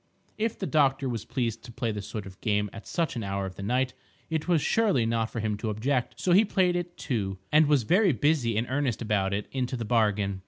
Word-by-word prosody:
If 225 +1 -1
the 195 - -3
doctor 140 -4 +2
was 115 -4 -3
pleased 115 -4 -2
to 120 - -10
play 115 0 -2
this 105 -1 -5
sort 105 -1 -5
of 95 -1 -12
game 105 -2 0
at 100 - -10
such 165 -5 -1
an 120 - -3
hour 100 0 -2
of 95 - -6
the 100 - -9
night, 125 +5 0 0.4
it 160 0 -1
was 175 -3 +4
surely 195 - +2
not 115 -1 0
for 115 - -4
him 105 -1 -1
to 110 +1 -3
object. 125 +4 -1
So 180 - +1
he 195 +5 +7
played 185 -4 +2
it, 175 0 -4
too; 100 -6 -2
and 155 0 +6
was 145 -4 +3
very 185 - +4
busy 120 -3 +1
and 115 - +1
earnest 130 -3 -1
about 100 -3 +1
it 100 +1 -2
into 130 -1 -2
the 115 - -4
bargain. 105 -4 +1
120 Hz, 240 wpm, -27 LUFS, 105-150 Hz, 0.4 s, he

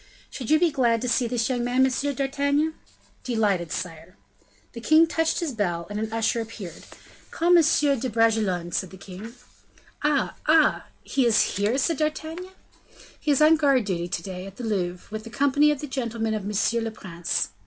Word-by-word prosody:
"Should 250 -4 -6
you 310 - +6
be 345 -2 +3
glad 240 -5 +2
to - - -1
see 245 0 +1
this 235 -1 0
young 245 -2 -1
man, 250 +2 +3
M. 275 +2 -1
d'Artagnan?" 285 +3 0 0.5
"Delighted, 205 -9 0
sire." 180 0 -6 0.6
The 235 - -8
king 315 +6 +5
touched 325 +1 0
his 330 -4 -2
bell, 175 -7 -2
and 205 - -3
an 220 0 -3
usher 225 +1 0
appeared. 210 -7 -9 0.4
"Call 345 +2 +3
M. 340 - +7
de 280 -4 +2
Bragelonne," 215 -6 +1
said 185 - -2
the 190 - -12
king. 200 +6 -10 0.7
"Ah! 295 -2 +1
ah! 310 0 +4 0.2
he 265 -3 +1
is 225 - +2
here?" 205 +5 +1
said 310 +3 +1
D'Artagnan. 315 +4 -3 0.7
"He 305 - -4
is 290 +1 +4
on 315 +1 +6
guard 275 -6 +3
to 175 -3 -2
day, 185 +2 -5
at 195 - -11
the 245 - -8
Louvre, 180 -5 -2
with 215 0 -5
the 230 - -9
company 285 +4 +3
of 295 -2 -1
the 295 - -5
gentlemen 230 -4 -2
of 210 -2 -3
monsieur 210 +3 0
le 225 - -2
prince." 175 -6 -3
235 Hz, 185 wpm, -25 LUFS, 205-285 Hz, 0.7 s, M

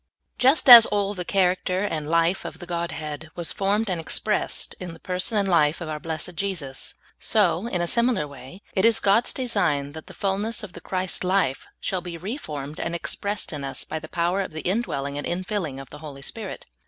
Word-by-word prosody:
JUST 265 +4 +4
as 240 -3 +12
all 205 -1 0
the 180 -3 -4
character 185 0 +1
and 155 -7 -2
life 165 +3 +2
of - - -7
the 175 - -9
Godhead 160 -3 -4
was 170 -2 -1
formed 205 +3 0
and 180 -4 -1
expressed 210 +5 0
in 180 -2 -6
the 165 - -13
person 185 +5 -1
and 200 -1 +2
life 160 -4 +3
of 170 -3 -5
our 155 -1 -3
blessed 160 +3 -4
Jesus, 165 -7 -4 0.2
so, 205 -1 +2
in 180 -7 -1
a 175 - 0
similar 235 -5 +2
wa^^ 140 +6 -12
it 190 - +1
is 230 0 +5
God's 205 +4 +3
de 260 - -3
sign 145 -10 +1
that 160 +1 -10
the - - -11
fullness 205 +4 -1
of 195 - -8
the - - -10
Christ 185 0 -2
life 180 -8 +1
shall 185 -2 -2
be 175 -1 -6
re 195 +9 -4
formed 150 - -7
and 170 - -2
expressed 200 +2 -3
in 145 -2 -5
us 135 -1 -3
by 160 - -4
the 155 0 -10
power 175 +3 0
of 185 - -5
the 160 - -4
in 195 +6 +1
dwelling 140 -10 -3
and - - -4
infilling 180 -5 -3
of 135 -1 -10
the 150 - -10
Holy 145 -3 -9
Spirit. 215 +5 -7
180 Hz, 215 wpm, -24 LUFS, 155-200 Hz, 0.2 s, as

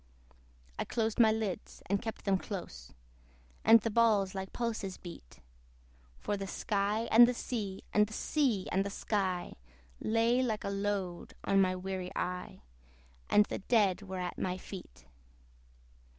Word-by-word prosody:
I - - +1
closed 225 -1 -1
my 220 -2 +7
lids, 215 -4 -4
and 200 +1 0
kept 225 -2 -6
them 195 -2 +2
close, 65 - -7 0.7
And 225 +1 +8
the 225 - -1
balls 210 -4 +3
like 190 -1 -5
pulses 220 -5 -3
beat; 65 - -11 0.8
For 205 - -2
the 195 -1 -4
sky 205 +3 -1
and 235 +2 +9
the 250 - 0
sea, 205 -6 -4
and 210 0 +4
the 220 - -10
sea 245 -8 0
and 190 +2 +2
the 200 - -3
sky 190 -3 -2 0.4
Lay 230 +3 +2
like 225 -4 -1
a - - -2
load 200 -3 -3
on 195 0 +3
my 185 -1 +2
weary 185 0 -4
eye, 180 - -4 0.7
And 210 - +6
the - - -4
dead 200 -3 +2
were 190 -2 -6
at 180 -1 -4
my 185 0 -1
feet. 185 0 -10
200 Hz, 150 wpm, -32 LUFS, 185-220 Hz, 0.8 s, and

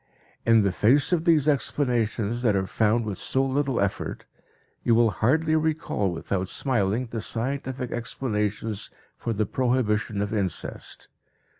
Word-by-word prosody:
In 115 -2 +6
the 100 - +2
face 125 - +3
of 165 -1 +1
these 155 -4 +4
explanations 120 -5 0
that 110 -5 +2
are 95 -1 +1
found 110 +4 +1
with 105 -3 -4
so 135 0 +1
little 135 -1 0
effort, 100 0 -2 0.6
you 115 - +3
will 115 -1 +4
hardly 155 - +2
recall 155 -10 0
without 90 +2 -3
smiling 120 -2 0
the 115 -1 -5
scientific 130 +2 -3
explanations 105 -3 -2 0.3
for 115 - -4
the 110 -1 0
prohibition 110 -4 0
of 105 - -4
incest. 100 -4 -3
115 Hz, 140 wpm, -25 LUFS, 105-130 Hz, 0.6 s, In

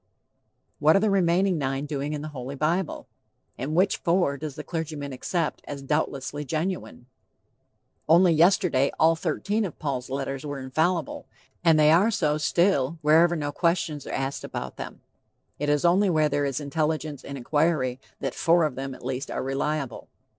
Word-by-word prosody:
What 155 +2 +5
are - - +5
the 210 0 +2
remaining 185 -1 +2
nine 135 0 -2
doing 145 0 -3
in 150 -1 -4
the 155 - -5
Holy 130 +1 -6
Bible? 160 +4 -1 0.5
And 145 +5 -4
which 185 +3 +3
'four' 170 -5 +1
does 150 -1 -6
the - - -6
clergyman 155 -4 -4
accept 165 +5 -2
as 140 -1 -6
doubtlessly 145 0 -2
"genuine?" 160 -2 -3 1.0
Only 170 +1 +6
yesterday 165 -4 +3
all 165 +1 +5
thirteen 195 +7 -1
of 185 - -5
Paul's 135 -4 -3
letters 135 0 -3
were 145 -1 -4
infallible, 155 +5 -1 0.4
and 165 -2 +5
they 150 0 +6
are 185 +7 +5
so 155 -9 0
still 165 -3 +2
wherever 165 +3 +5
no 145 -2 -2
questions 165 -3 -1
are - - -5
asked 135 +1 -3
about 65 - -6
them. - - -8 0.6
It 145 +1 -1
is 145 +2 +2
only 190 +4 +4
where 155 -3 +2
there 145 0 0
is 140 0 -2
intelligence 150 0 -2
and 140 - -7
inquiry 140 -1 0 0.2
that - - -2
"four 170 0 +3
of 150 -3 0
them" 135 0 -5
at - - -13
least 130 +1 -3
are - - -3
reliable. 135 -1 -2
150 Hz, 170 wpm, -26 LUFS, 140-170 Hz, 1.0 s, Only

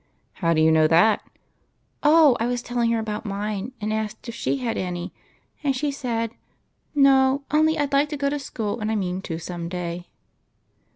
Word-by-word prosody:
" - - -44
How 165 -1 +2
do 155 - +3
you 160 0 +5
know 160 -1 +5
that? 175 +7 +4 0.3
" - - -44
" - - -45
Oh, 300 -3 +6
I 230 - 0
was 245 -1 -2
telling 240 -1 0
her 230 - +2
about 215 -1 -3
mine, 205 +2 -3
and 215 0 -2
asked 215 +2 -4
if 235 - -5
she 230 - -1
had 245 -4 -2
any, 180 -1 -4 0.5
and 275 -2 +1
she 285 +3 -1
said, 230 -5 -2 0.4
' - - -47 0.2
No, 270 -1 +4
only 315 +1 +3
I 290 - +2
'd 280 - -8
like 285 +2 +3
to 300 - -4
go 280 0 0
to 290 - -2
school, 225 -5 -4
and 215 0 -2
I - - 0
mean 185 -2 -2
to 165 -4 -5
some 170 0 -6
day.' 175 -1 -5
225 Hz, 220 wpm, -24 LUFS, 185-275 Hz, 0.5 s, Oh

